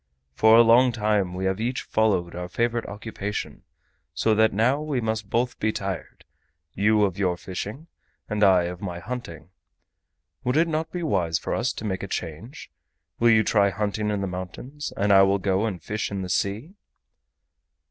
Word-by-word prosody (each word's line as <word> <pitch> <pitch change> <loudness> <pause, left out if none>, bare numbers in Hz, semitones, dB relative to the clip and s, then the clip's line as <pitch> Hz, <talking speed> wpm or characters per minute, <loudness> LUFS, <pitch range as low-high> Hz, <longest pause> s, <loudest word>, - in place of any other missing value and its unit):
For 110 +10 +5
a 120 - +8
long 120 +2 +5
time 105 -5 0
we 95 +1 -3
have 95 +1 0
each 125 +3 -2
followed 95 -6 +1
our 90 0 -5
favorite 120 +3 -1
occupation, 105 0 -5 0.5
so 110 - +2
that 110 +1 +4
now 125 +8 +2
we 150 -4 -2
must 110 -3 -3
both 120 +2 -1
be 110 - +1
tired, 95 -4 -6 0.5
you 105 +1 +3
of 100 -1 -1
your 90 -3 +1
fishing 100 - -6 0.4
and 105 -1 -1
I 95 -3 +5
of 90 +1 -5
my 90 -4 -4
hunting. 90 -6 -7 0.9
Would 125 +4 0
it 165 +1 +4
not 160 0 -2
be 175 -1 -4
wise 85 - +1
for - - -4
us - - 0
to - - -7
make 95 -3 -2
a 100 - -5
change? 90 - -6 0.5
Will 120 - +5
you 110 -1 +5
try 100 -3 +3
hunting 105 +1 -2
in 105 -1 -1
the - - -1
mountains 95 +11 -6
and 100 +1 +3
I 95 - +8
will 95 0 +4
go 95 +2 0
and 95 -5 -4
fish 105 +7 -3
in 100 -1 -4
the 90 - -6
sea?" 105 - -2
105 Hz, 185 wpm, -25 LUFS, 95-115 Hz, 0.9 s, a